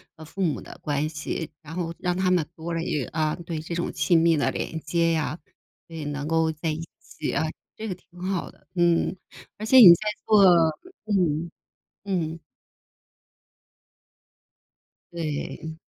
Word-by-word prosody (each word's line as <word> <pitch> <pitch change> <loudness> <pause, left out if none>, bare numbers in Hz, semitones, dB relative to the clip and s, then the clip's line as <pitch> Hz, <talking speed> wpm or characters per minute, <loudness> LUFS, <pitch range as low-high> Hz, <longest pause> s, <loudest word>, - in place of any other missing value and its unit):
呃， 160 0 -11
父 195 +5 -7
母 165 -6 +1
的 - - -11
关 145 0 0
系， 155 +1 -4
然 160 0 -10
后 170 -2 -2
让 180 0 0
他 185 -1 +2
们 175 -4 +2
多 165 +1 -5
了 165 - -1
一 150 -5 -1
个 - - -8
啊， 155 -1 0
对， 165 -2 -3
这 165 +2 -5
种 175 - -2
亲 170 -3 +3
密 165 -1 +4
的 145 - +1
连 160 - -4
接 165 +2 +1
呀， 155 0 -1 0.5
所 165 - -11
以 160 - -5
能 145 0 -3
够 160 0 +2
在 155 +1 -3
一 155 - -4 0.2
起 155 - -5
啊， - - 0 0.3
这 220 - -5
个 190 - -3
挺 175 0 -19
好 185 -1 -2
的。 - - -27
嗯， 175 0 +2 0.4
而 215 - -5
且 260 +4 +5
你 230 - +12
在 210 +5 -1 0.2
做 210 -2 +6 0.6
嗯， 170 -5 +1 0.5
嗯。 170 -5 -2 2.7
对。 160 0 -4
165 Hz, 175 characters per minute, -25 LUFS, 155-180 Hz, 2.7 s, 你